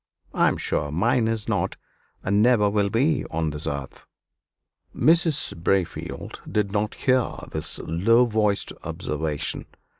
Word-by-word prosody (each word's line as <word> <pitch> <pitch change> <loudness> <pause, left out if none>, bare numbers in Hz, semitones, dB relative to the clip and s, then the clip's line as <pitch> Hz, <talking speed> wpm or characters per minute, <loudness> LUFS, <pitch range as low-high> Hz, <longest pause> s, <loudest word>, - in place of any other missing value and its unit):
"I - - +3
am - - +1
sure 75 - -1
mine 115 - +2
is 115 -2 -1
not, - - -1 0.5
and 100 +2 +2
never 115 -3 +4
will 100 -1 +1
be 130 +7 +2
on 80 -1 -1
this 75 +1 -2
earth." 70 -2 -5 0.9
Mrs. 165 -2 +3
Braefield 85 +2 -2
did 105 -2 0
not 105 +1 -1
hear 130 -2 +2 0.2
this - - -1
low 115 +9 +4
voiced 105 -3 0
observation. 75 -1 -3
105 Hz, 130 wpm, -24 LUFS, 80-120 Hz, 0.9 s, never